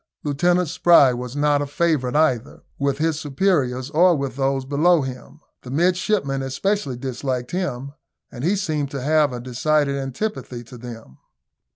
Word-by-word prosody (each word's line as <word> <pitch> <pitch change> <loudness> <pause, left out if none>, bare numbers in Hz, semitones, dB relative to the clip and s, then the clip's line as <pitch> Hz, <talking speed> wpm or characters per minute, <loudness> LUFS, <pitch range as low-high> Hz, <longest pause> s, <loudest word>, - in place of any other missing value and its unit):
Lieutenant 175 +5 +1
Spry 160 -4 +5
was 125 +1 -6
not 145 0 +2
a 145 - -2
favourite 145 -5 0
either 130 -6 +1 0.2
with 140 -1 0
his 155 0 0
superiors 140 -4 0
or 175 +2 +5
with 140 -3 -3
those 135 -1 0
below 155 +3 +3
him. 130 -2 -8 0.2
The 125 - -11
midshipmen 175 - +1
especially 135 +2 -2
disliked 130 -1 -4
him, 140 -7 -3 0.4
and 120 - -8
he 185 +6 +2
seemed 155 -7 -2
to 140 -1 -5
have 150 -1 +3
a 125 - -5
decided 140 +4 0
antipathy 135 - -4
to 125 +1 -12
them. 115 - -10
140 Hz, 155 wpm, -22 LUFS, 130-160 Hz, 0.4 s, Spry